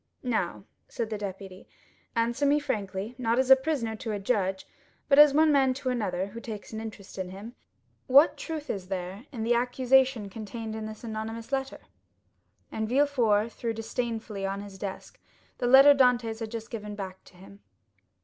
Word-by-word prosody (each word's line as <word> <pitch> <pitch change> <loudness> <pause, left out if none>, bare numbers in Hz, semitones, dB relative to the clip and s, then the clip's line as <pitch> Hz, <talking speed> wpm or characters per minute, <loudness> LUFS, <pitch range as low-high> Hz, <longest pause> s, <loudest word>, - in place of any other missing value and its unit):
"Now," 220 -8 -1 0.2
said 225 -2 -4
the 215 - -2
deputy, 195 -1 -7 0.5
"answer 235 +4 0
me 285 +1 +4
frankly, 200 -4 -3
not 230 -1 +1
as 260 0 +2
a - - +12
prisoner 265 -5 -2
to 220 - -5
a - - -1
judge, 195 -3 -1 0.4
but 280 0 +5
as 295 -1 +9
one 310 +2 +4
man 265 -3 +3
to 270 -1 -3
another 205 -7 -1
who 215 +4 -9
takes 220 -2 -8
an 220 - -4
interest 205 -3 -9
in 185 -1 -3
him, 200 +5 -9 0.5
what 280 +5 +6
truth 315 -2 -6
is 190 -2 -6
there 190 +5 -5
in 235 -6 -4
the 235 +2 +2
accusation 250 -1 +2
contained 220 +2 -6
in 220 -1 -5
this 215 +1 -10
anonymous 225 +1 -5
letter?" 270 0 -2 0.9
And 220 0 -3
Villefort 240 -6 +2
threw 230 -1 -3
disdainfully 225 -2 -4
on 195 +1 -2
his 200 -1 -10
desk 195 -1 -7 0.4
the 245 - 0
letter 270 +3 +9
Dantès 245 -4 +2
had 225 -1 -4
just 225 0 -7
given 210 -2 -6
back 190 -2 -7
to 180 - -18
him. 195 +2 -15
225 Hz, 180 wpm, -28 LUFS, 200-255 Hz, 0.9 s, a